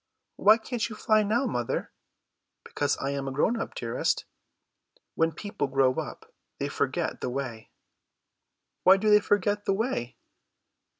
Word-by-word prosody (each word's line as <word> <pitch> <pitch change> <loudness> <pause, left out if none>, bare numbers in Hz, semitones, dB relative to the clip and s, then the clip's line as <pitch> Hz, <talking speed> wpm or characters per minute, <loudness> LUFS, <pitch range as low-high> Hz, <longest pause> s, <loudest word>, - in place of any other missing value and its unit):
"Why 215 +2 +6
can't 235 0 -3
you 215 - -7
fly 215 -1 +3
now, 220 +6 +1
mother?" 120 - -2 0.7
"Because - - -1
I 135 - -2
am 135 -1 -3
grown 220 - +1
up, - - -6
dearest. 115 -1 -1 0.9
When 165 0 +2
people 200 -2 -4
grow 135 -1 +3
up - - -8 0.2
they - - -2
forget - - -2
the - - -2
way." 125 -4 -5 1.1
"Why 190 +1 +7
do 210 +2 +2
they 210 - +8
forget 205 0 0
the 195 - +2
way?" 200 - -2
195 Hz, 140 wpm, -27 LUFS, 135-215 Hz, 1.1 s, they